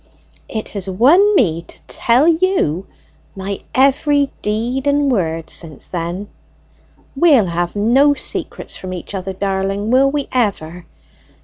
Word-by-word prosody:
It 220 -1 -4
has 195 -2 -5
won 330 - +4
me 170 - +2
to 170 - -13
tell 245 +6 +2
you 330 - +1 0.5
my 195 0 -4 0.2
every 280 +1 +3
deed 235 +6 -2
and 285 -1 +2
word 165 -7 -1
since 155 -5 -5
then. 175 +3 -4 0.9
We'll 280 - +5
have 175 +1 -2
no 260 +8 +4
secrets - - -4
from 185 -1 -7
each 180 +2 -8
other, 190 0 -4
darling, 195 +2 -2
will 270 +2 +4
we 285 0 -2
ever? 180 -8 -2
210 Hz, 130 wpm, -18 LUFS, 185-275 Hz, 0.9 s, We'll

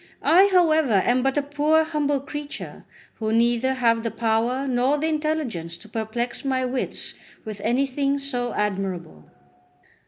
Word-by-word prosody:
I, 380 +4 +6
however, 315 - +4
am 250 +1 +3
but 270 +2 0
a 290 - +2
poor 295 +2 +2
humble 295 -3 0
creature, 295 +1 -7 0.3
who 220 -1 -1
neither 240 +3 +2
have 230 -3 +2
the 230 - -2
power 235 +4 0
nor 260 +3 +2
the 300 - -1
intelligence 300 - -2
to 215 - -14
perplex 225 +4 -3
my 260 -2 0
wits 255 0 -3 0.3
with 215 -2 -7
anything 275 +4 0
so 250 -4 -2
admirable." 190 - -3
255 Hz, 145 wpm, -24 LUFS, 225-290 Hz, 0.3 s, I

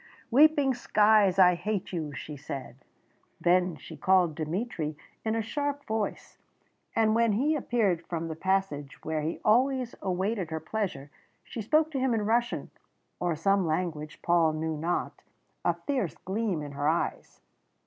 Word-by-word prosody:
"Weeping 285 0 +5
skies, 210 -5 +4
I 180 -2 +7
hate 190 +2 -3
you!" 155 -4 -3
she 145 +2 -7
said. 135 -3 -7 0.6
Then 180 0 +3
she 145 - -11
called 185 -4 +3
Dmitry 155 -1 -3 0.3
in 220 0 0
a 225 - 0
sharp 285 +4 -3
voice, 220 -1 -3 0.6
and 220 -1 +3
when 230 -1 +3
he 285 +9 +2
appeared 220 - +1
from 165 -1 -3
the 160 - -4
passage 185 -5 -1
where 155 -1 -1
he 160 +3 -3
always 255 +2 +3
awaited 190 0 -1
her 160 0 -3
pleasure, 165 -9 -4 0.3
she 205 +5 -6
spoke 310 +8 +2
to 275 - -2
him 255 -2 +2
in 210 -2 -1
Russian, 235 +2 0 0.5
or 175 -2 0
some 195 +3 +2
language 155 -2 -3
Paul 170 -2 +3
knew 160 0 -2
not, 165 +4 -2 0.4
a - - +2
fierce 255 - -2
gleam 190 -4 -1
in 145 - -7
her 145 +1 -2
eyes. 165 +2 -1
190 Hz, 155 wpm, -28 LUFS, 160-225 Hz, 0.6 s, I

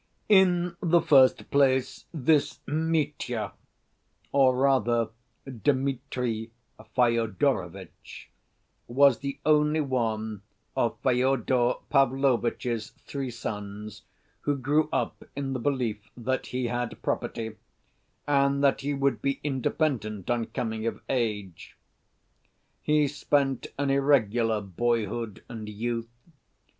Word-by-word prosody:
In 180 -3 +4
the 170 0 +4
first 135 -5 +4
place, 130 -2 +2
this 150 -1 +2
Mitya, 150 -8 -1 0.8
or 135 -2 +4
rather 120 -4 +2 0.4
Dmitri 130 -3 -1 0.5
Fyodorovitch, 115 - -1 0.6
was 135 +1 +4
the 140 0 -4
only 150 0 +3
one 110 -6 -2 0.3
of - - 0
Fyodor 125 -1 +2 0.2
Pavlovitch's 125 -4 +1
three 135 -2 -4
sons 105 -2 -6 0.4
who 145 -1 0
grew 145 +4 +1
up - - -2
in 135 -1 -3
the 130 - -2
belief 120 -5 -2
that 130 +2 -2
he 125 0 -2
had 120 0 -3
property, 110 -1 -3 0.7
and 140 -1 +2
that 140 -1 +3
he 145 +1 -1
would 135 -3 0
be 140 0 -1
independent 130 - -1
on 120 -2 0
coming 110 -3 -3
of 110 -2 -3
age. 105 -8 -3 1.0
He 150 -1 +3
spent 140 -2 0
an 140 0 0
irregular 120 -6 +2
boyhood 110 +2 -2
and 110 -3 -7
youth. 115 +2 -3
130 Hz, 105 wpm, -27 LUFS, 115-140 Hz, 1.0 s, In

